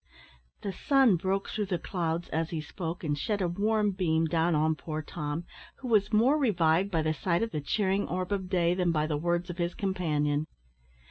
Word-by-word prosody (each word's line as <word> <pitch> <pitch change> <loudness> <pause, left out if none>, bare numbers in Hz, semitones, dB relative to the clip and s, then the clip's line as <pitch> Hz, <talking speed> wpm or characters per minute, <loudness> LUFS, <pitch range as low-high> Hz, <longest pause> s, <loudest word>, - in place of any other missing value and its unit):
The 200 - -3
sun 265 0 +4
broke 190 +3 -1
through 210 -2 -2
the 185 -2 0
clouds 170 -2 -2
as 160 +1 -1
he 165 - -3
spoke 165 +3 -5
and 150 -2 0
shed 205 +8 -1
a 185 - +1
warm 210 +4 +1
beam 165 -4 +1
down 165 +1 +1
on 155 +1 +2
poor 155 0 -5
Tom, 150 +1 -4 0.3
who 260 - -8
was 210 -2 +3
more 245 +8 +4
revived 180 - +2
by 165 -4 0
the 155 0 +1
sight 170 +5 0
of 230 - -3
the 150 - -3
cheering 195 +5 0
orb 185 +2 -3
of 190 -2 -2
day 175 -2 +2
than 180 -1 +1
by 155 -2 +1
the 155 -1 -1
words 175 +3 -1
of 175 - -10
his 175 0 -1
companion. 155 -6 0
175 Hz, 205 wpm, -29 LUFS, 160-195 Hz, 0.3 s, sun